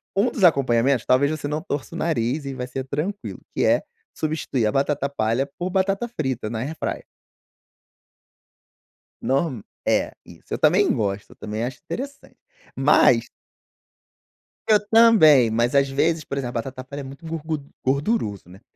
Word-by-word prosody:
Um 220 +5 +2
dos 205 - -3
acompanhamentos, 135 -5 +3
talvez, 140 +4 +3
você 150 -2 -3
não 150 +1 -2
torça 145 -7 -5
o - - -4
nariz 140 -2 -1
e 135 - -4
vai 125 -1 -5
ser 130 +1 -5
tranquilo, 180 +10 -4 0.2
que - - +2
é - - +4 0.3
substituir 150 -6 -1
a 105 - +1
batata 140 0 0
palha 130 +1 0
por 180 +1 -2
batata 195 +4 0
frita 130 - -3
na 110 -1 -4
AirFryer. 150 +4 -4 2.2
Nor 135 -5 -1 0.2
é, - - +1
isso, - - -11
eu - - 0
também - - +4
gosto, 100 -1 -3
também 110 +2 -4
acho 125 +1 -6
interessante, 280 +2 -7 0.4
mas - - +4 1.4
eu 210 - +6
também, 185 - +7
mas, 120 +3 +1
às 140 0 +4
vezes, 155 +3 +1
por 140 - -5
exemplo, 125 -3 -3
a - - 0
batata 130 0 -8
palha 140 +2 -7
é - - -7
muito 135 +5 -11
gorgud 160 -2 -4 0.2
gorduroso, 135 - 0
né, 95 +4 -15
140 Hz, 155 wpm, -23 LUFS, 125-160 Hz, 2.2 s, também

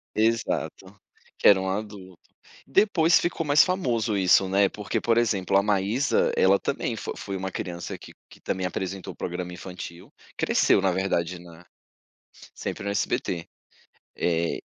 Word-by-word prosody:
Exato, 110 -3 -1 0.4
que - - +3
era 100 -2 +7
um 95 - -2
adulto. 95 -3 -6 0.5
Depois 175 0 +4
ficou 170 -1 -2
mais 145 0 +6
famoso 120 - 0
isso, 95 0 +4
né, 100 +1 +3
porque, 105 +1 -3
por 115 0 +2
exemplo, 100 -5 +1
a 100 - +5
Maísa, 105 +6 +1
ela 95 +1 +4
também - - -2
fo - - -5
foi 100 - -5
uma 95 0 -4
criança 85 -1 -5
que - - -13 0.2
que - - -16
também 95 - -3
apresentou 95 +1 -4
programa 90 0 -5
infantil, 90 -1 -9 0.2
cresceu, - - +3
na 95 -1 +1
verdade 90 -2 -1
na 85 0 -15 0.9
sempre - - -5
no 100 - -2
SBT. 85 -4 -2 0.7
Eh, 85 -1 0
95 Hz, 145 wpm, -25 LUFS, 90-110 Hz, 0.9 s, era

